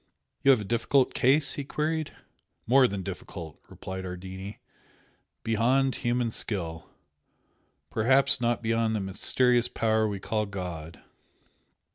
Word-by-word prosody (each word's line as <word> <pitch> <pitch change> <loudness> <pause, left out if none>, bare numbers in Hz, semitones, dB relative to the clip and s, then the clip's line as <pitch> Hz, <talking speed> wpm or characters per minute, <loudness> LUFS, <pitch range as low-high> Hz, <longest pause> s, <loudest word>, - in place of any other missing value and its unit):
"You 140 - +4
have 130 -5 +6
a - - -6
difficult 120 +5 +2
case?" 135 +3 +3
he 145 - -4
queried. 155 +2 -2 0.5
"More 130 +2 +5
than 100 -3 -4
difficult!" 90 -4 -8
replied 95 0 -7
Ardini 95 +2 -7 0.9
"Beyond 125 +4 +2
human 120 -1 0
skill! 85 -8 -4 1.0
Perhaps 135 +3 +3
not 120 0 0
beyond 115 0 +1
the - - 0
mysterious 120 +5 +1
power 110 -2 +1
we 100 -2 -4
call 105 +2 -2
God." 85 -5 -7
110 Hz, 120 wpm, -27 LUFS, 95-130 Hz, 1.0 s, have